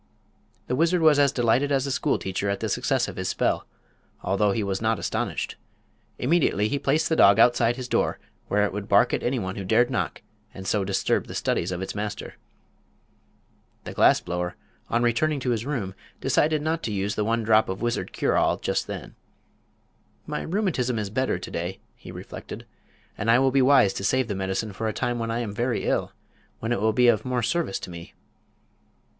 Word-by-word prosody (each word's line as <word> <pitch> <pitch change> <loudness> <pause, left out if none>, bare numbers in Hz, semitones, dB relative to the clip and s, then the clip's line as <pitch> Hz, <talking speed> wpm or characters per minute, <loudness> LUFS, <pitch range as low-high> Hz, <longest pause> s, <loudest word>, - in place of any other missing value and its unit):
The 125 - -1
wizard 170 +4 +2
was 155 -2 +5
as 140 -2 +4
delighted 125 +4 +2
as 135 -1 +2
a 140 - -2
school 135 - +1
teacher 95 +1 -3
at 100 0 -1
the - - -2
success - - 0
of - - -8
his - - -2
spell, - - 0 0.6
although 100 +2 +2
he 110 +1 -1
was 100 0 -2
not 110 0 +1
astonished. - - -3 0.6
Immediately 125 - +2
he 140 - -1
placed 150 +4 +1
the 160 - +1
dog 100 -8 +6
outside 120 0 +4
his 130 -1 -6
door, - - 0 0.3
where 105 0 +2
it 105 - -3
would 100 0 -5
bark 100 0 +4
at - - 0
anyone 115 -7 -2
who 100 - -4
dared 115 +6 +3
knock 125 - -2 0.3
and 95 - -8
so 100 +1 +1
disturb 95 0 0
the - - -8
studies 85 - -1
of 90 +1 -3
its - - -5
master. 105 0 -5 1.5
The - - -7
glass - - +5
blower, 90 +1 -4 0.3
on 120 +1 +1
returning 140 +6 +1
to 125 - 0
his 115 +2 -2
room, 115 -10 -3 0.3
decided 155 0 +1
not 160 +1 -1
to 110 - -3
use 100 0 -1
the 105 - -1
one 115 +1 0
drop 110 -1 +4
of 95 +4 -4
wizard 120 0 -1
cure - - 0
all - - +2
just - - -2
then. - - -7 1.1
"My - - -3
rheumatism 160 - -1
is 105 -2 -3
better 130 -3 0
to 90 - -8
day," 90 +3 -4 0.2
he - - -11
reflected, - - -9 0.5
"and 110 - -1
I 115 - +6
will 135 +1 +3
be 135 +1 +3
wise 130 -7 +5
to 95 - -5
save 130 +4 +1
the - - -1
medicine 95 +2 -3
for 110 +3 -3
a 110 - -1
time 120 0 -2
when 115 0 -2
I 115 +1 -1
am 105 -4 -4
very 120 +3 -1
ill, - - 0 0.5
when 115 - -4
it 120 - 0
will 110 +1 +3
be 125 +3 +3
of 115 -3 +4
more 125 -2 -1
service 155 - 0
to - - -7
me." 85 -1 -10
115 Hz, 205 wpm, -25 LUFS, 100-130 Hz, 1.5 s, dog